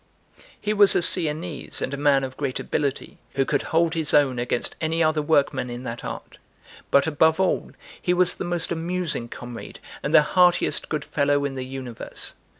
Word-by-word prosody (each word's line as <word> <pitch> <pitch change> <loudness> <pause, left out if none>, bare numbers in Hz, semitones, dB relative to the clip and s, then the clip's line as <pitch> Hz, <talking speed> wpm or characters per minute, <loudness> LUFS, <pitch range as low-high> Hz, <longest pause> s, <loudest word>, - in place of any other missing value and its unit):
He 210 - -1
was 205 -1 +6
a - - +3
Sienese 160 -3 +2
and 135 - -3
a - - -1
man 140 -1 +2
of 130 0 -5
great 140 -3 -3
ability, 140 -2 -3 0.2
who 135 -1 +1
could 145 - 0
hold 165 0 +1
his 160 -3 0
own 135 -4 +3
against 120 0 -2
any 165 +1 0
other 155 -1 +1
workman 140 -4 +1
in 120 +1 -7
that 115 -2 -6
art; - - -8 0.5
but, 140 - +4
above 160 +2 +2
all, 190 - 0 0.3
he 180 - 0
was 180 0 +3
the - - -6
most 175 -1 -2
amusing 170 -7 -3
comrade 120 -1 -9 0.2
and - - -3
the 150 - +6
heartiest 180 +3 +2
good 150 -2 -3
fellow 145 0 +1
in 140 - -3
the 130 -1 -5
universe. 130 -3 -5
150 Hz, 185 wpm, -23 LUFS, 135-165 Hz, 0.5 s, was